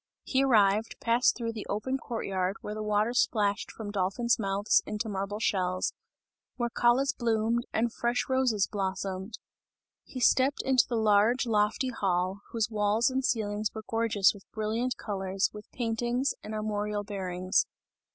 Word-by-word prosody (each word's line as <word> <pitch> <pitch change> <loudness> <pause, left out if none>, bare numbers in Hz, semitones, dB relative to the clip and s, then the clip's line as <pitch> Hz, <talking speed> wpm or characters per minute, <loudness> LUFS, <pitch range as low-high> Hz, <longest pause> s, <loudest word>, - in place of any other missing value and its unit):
He 265 0 +1
arrived, 215 -3 +3
passed 235 +2 +3
through 230 -1 -3
the 220 - -7
open 260 +6 -1
court 235 -3 -4
yard, 190 0 -1
where 210 - -5
the 215 - -5
water 210 +2 +1
splashed 210 -5 +1
from 210 -2 -7
dolphin's 205 +5 +1
mouths 200 0 +2
into 210 +1 -3
marble 200 0 -3
shells, 185 -4 0 0.6
where 240 -1 -2
callas 245 +4 +3
bloomed 230 0 0
and 230 +1 0
fresh 240 +1 0
roses 255 -6 +2
blossomed. 190 +1 -4 0.7
He 255 - -8
stepped 260 +3 +3
into 260 -2 +3
the 240 - -1
large, 220 +3 +3
lofty 215 +3 +1
hall, 190 -3 -1
whose 230 -1 -1
walls 215 +4 +2
and 265 +1 -1
ceilings 210 -3 0
were 220 - -6
gorgeous 225 -4 +2
with 200 -2 -16
brilliant 225 +4 -2
colours, 195 -2 -1
with 210 0 -11
paintings 240 +2 -1
and 215 +1 -6
armorial 210 -1 -2
bearings. 185 -2 -1
215 Hz, 150 wpm, -29 LUFS, 200-235 Hz, 0.7 s, arrived